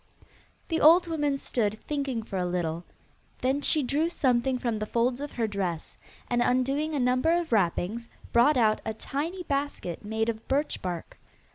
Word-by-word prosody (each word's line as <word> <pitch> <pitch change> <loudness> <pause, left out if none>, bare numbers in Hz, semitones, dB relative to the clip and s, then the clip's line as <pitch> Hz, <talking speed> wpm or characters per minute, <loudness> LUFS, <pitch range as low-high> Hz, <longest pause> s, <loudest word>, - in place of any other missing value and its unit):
The 325 - 0
old 335 +4 +7
woman 295 -4 0
stood 220 -5 -1
thinking 275 -6 -2
for 200 -3 -5
a 180 - 0
little: 170 -1 -2 0.6
then 265 +3 +1
she 305 0 +2
drew 295 +6 +1
something 260 -5 +1
from 235 -3 -2
the 215 - -3
folds 245 +4 0
of 290 - -5
her 230 - 0
dress, 190 -6 -3 0.3
and, 240 0 +1
undoing 275 +6 +1
a - - 0
number 255 +5 +2
of 340 -5 -5
wrappings, 215 +3 0 0.2
brought 260 +5 +5
out 215 -3 +3
a 220 - -3
tiny 325 +10 -4
basket 280 - -3
made 220 +1 -1
of 225 -1 -4
birch 285 +3 0
bark. 175 -3 -5
250 Hz, 170 wpm, -28 LUFS, 215-285 Hz, 0.6 s, old